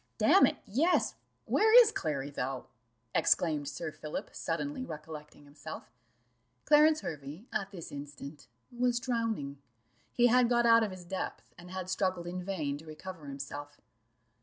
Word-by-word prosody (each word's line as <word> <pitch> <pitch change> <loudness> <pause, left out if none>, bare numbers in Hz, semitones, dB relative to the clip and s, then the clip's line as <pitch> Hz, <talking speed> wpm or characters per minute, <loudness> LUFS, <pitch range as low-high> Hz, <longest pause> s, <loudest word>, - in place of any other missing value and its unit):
"Damn - - +6
it, - - -2
yes 320 - +2 0.3
where 440 +3 +7
is 460 -3 +7
Clary, 145 - -2
though?" 130 -1 -3 0.5
exclaimed 150 -4 +2
Sir 160 0 -5
Philip, 155 0 -6
suddenly 260 - -3
recollecting 150 - -9
himself. 145 +1 -9 0.7
Clarence 305 +1 +6
Hervey 155 +2 -7
at 195 -1 -1
this 180 -5 -9
instant 145 0 -9 0.3
was 245 0 +2
drowning: 225 - -2 0.5
he 240 - +3
had 245 0 +5
got 240 -1 +3
out 230 0 +7
of 220 - +1
his 185 -2 -9
depth, 190 +2 -5
and 175 +1 -13
had 185 0 -5
struggled 185 -2 -1
in 180 +1 -4
vain 155 -7 -2
to 160 - -13
recover 155 0 -9
himself. 145 +1 -7
175 Hz, 145 wpm, -31 LUFS, 145-235 Hz, 0.7 s, where